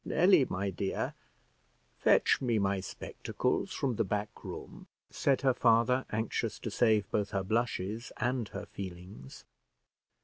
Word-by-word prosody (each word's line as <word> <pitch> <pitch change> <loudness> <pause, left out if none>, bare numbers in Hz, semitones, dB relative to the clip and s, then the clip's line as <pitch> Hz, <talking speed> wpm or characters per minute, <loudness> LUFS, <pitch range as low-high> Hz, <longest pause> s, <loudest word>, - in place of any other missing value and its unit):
"Nelly, 180 -4 +5
my 100 +2 -1
dear, 95 +2 -2 0.9
fetch - - +4
me 120 -4 +1
my 100 -1 +1
spectacles 95 - -3
from 130 -5 -1
the - - +3
back 105 +1 -3
room," - - -8 0.2
said 135 -2 +1
her 130 -2 +3
father, 120 +2 +3
anxious 110 +1 -2
to - - -4
save 110 -4 +3
both 105 -1 0
her 95 -1 -1
blushes 110 +1 -1
and 120 -1 0
her 100 +1 -7
feelings. 90 -6 -9
110 Hz, 135 wpm, -31 LUFS, 100-125 Hz, 0.9 s, Nelly